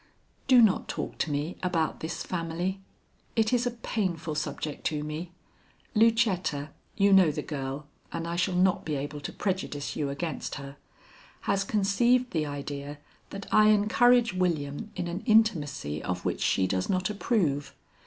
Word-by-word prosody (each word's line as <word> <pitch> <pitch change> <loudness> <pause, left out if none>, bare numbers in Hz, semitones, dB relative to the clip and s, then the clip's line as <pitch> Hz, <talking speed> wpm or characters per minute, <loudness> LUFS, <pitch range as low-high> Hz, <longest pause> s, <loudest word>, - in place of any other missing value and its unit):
"Do 255 -3 +7
not 210 -4 +3
talk - - -5
to - - 0
me 145 +4 -2
about 170 -4 0
this 160 +2 -4
family. 175 +2 -3 0.5
It 225 0 +2
is 245 0 +2
a 235 -1 -6
painful 170 -7 -1
subject 150 0 -4
to 150 -1 -1
me. 155 +3 -5 0.6
Lucetta 210 - +2 0.3
you 200 0 +5
know 190 -4 +7
the 150 - -3
girl, 140 0 -4 0.3
and 165 0 -4
I 170 - -2
shall 180 +1 0
not 185 +1 +3
be 155 - -2
able 145 +1 -4
to - - -5
prejudice 185 -7 -3
you 145 -2 -1
against 155 +4 -4
her 140 -1 -8 0.6
has 195 0 +1
conceived 235 +5 +2
the 155 -3 0
idea 145 0 -5 0.3
that 195 0 -7
I 215 0 +7
encourage 230 +2 +4
William 175 +1 -1
in 180 -2 -3
an 175 +3 -4
intimacy 150 - +2
of 90 0 -4
which - - -1
she 95 - +2
does 95 0 -1
not 185 +1 +1
approve. 165 - 0
175 Hz, 160 wpm, -28 LUFS, 145-205 Hz, 0.6 s, Do